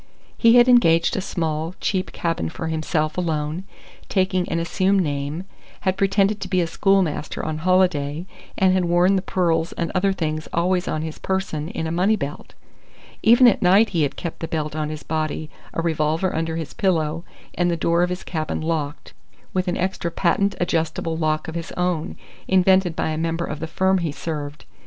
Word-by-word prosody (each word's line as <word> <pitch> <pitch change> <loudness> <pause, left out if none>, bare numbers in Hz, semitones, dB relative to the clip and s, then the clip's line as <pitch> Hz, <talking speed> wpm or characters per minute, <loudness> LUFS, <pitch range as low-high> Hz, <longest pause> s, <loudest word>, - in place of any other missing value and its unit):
He 230 0 +5
had 240 0 +7
engaged 170 -10 +4
a - - -1
small, 160 -1 -2
cheap 185 -2 -1
cabin 165 - -2
for 160 - -5
himself 155 0 -1
alone, 160 +1 -2 0.4
taking 185 -2 +1
an 165 - -1
assumed 190 +3 +1
name; 145 +2 -3 0.4
had 190 0 +1
pretended 195 +1 +2
to 190 - -4
be 185 -1 +1
a 175 - +2
schoolmaster 185 -3 0
on 155 -1 -3
holiday, 170 -3 +1 0.3
and 190 -1 +4
had 185 -1 +2
worn 175 +3 +3
the 190 - +1
pearls 170 -3 0
and 170 - -3
other 195 +1 +2
things 155 -4 -3
always 180 +2 +1
on 155 - -2
his 160 -1 -6
person 190 -6 -2
in 160 - -4
a 160 - -2
money 185 +6 +2
belt. 145 -7 -6 0.7
Even 240 +3 +7
at 235 - +3
night 195 +5 +5
he 170 -4 0
had 145 -2 0
kept 170 - -6
the 165 - -4
belt 155 -2 -3
on 155 -1 -2
his 155 -1 -6
body, 155 0 -3 0.2
a 165 - -3
revolver 160 +2 0
under 160 0 -1
his 160 -2 -5
pillow, 165 -4 0 0.3
and 175 0 +1
the 170 - 0
door 170 +1 +2
of 175 - +2
his 180 0 -4
cabin 155 -2 -3
locked, 155 -2 -3 0.4
with 185 -1 0
an 175 - 0
extra 185 -1 -1
patent 200 +4 +1
adjustable 165 -1 -1
lock 155 -1 -1
of 160 - -5
his 165 -1 -5
own, 180 -3 -2 0.3
invented 185 -2 +3
by - - -1
a 155 - -2
member 165 +1 -1
of 150 - -5
the 160 - -4
firm 190 +3 +2
he 165 -3 -2
served. 150 -1 -6
170 Hz, 190 wpm, -22 LUFS, 155-185 Hz, 0.7 s, had